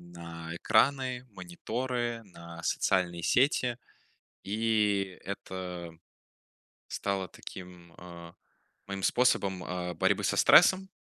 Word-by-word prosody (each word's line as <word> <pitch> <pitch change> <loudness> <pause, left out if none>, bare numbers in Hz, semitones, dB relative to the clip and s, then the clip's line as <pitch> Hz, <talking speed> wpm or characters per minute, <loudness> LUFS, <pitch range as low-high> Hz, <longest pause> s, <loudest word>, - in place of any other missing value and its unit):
на 85 -1 -9
экраны, 125 +5 +2
мониторы, 120 - -4
на 85 -3 -11
социальные 85 -1 0
сети. 125 - +2 0.7
И 105 -3 0
это 90 -3 -6 1.0
стало 100 -1 -2
таким, 90 -2 -11
а, 85 -1 -11 0.5
моим 100 -1 -5
способом, 100 -7 +2
а, 90 0 -4
борьбы - - +1
со - - +1
стрессом. 190 0 +6
95 Hz, 90 wpm, -30 LUFS, 85-120 Hz, 1.0 s, стрессом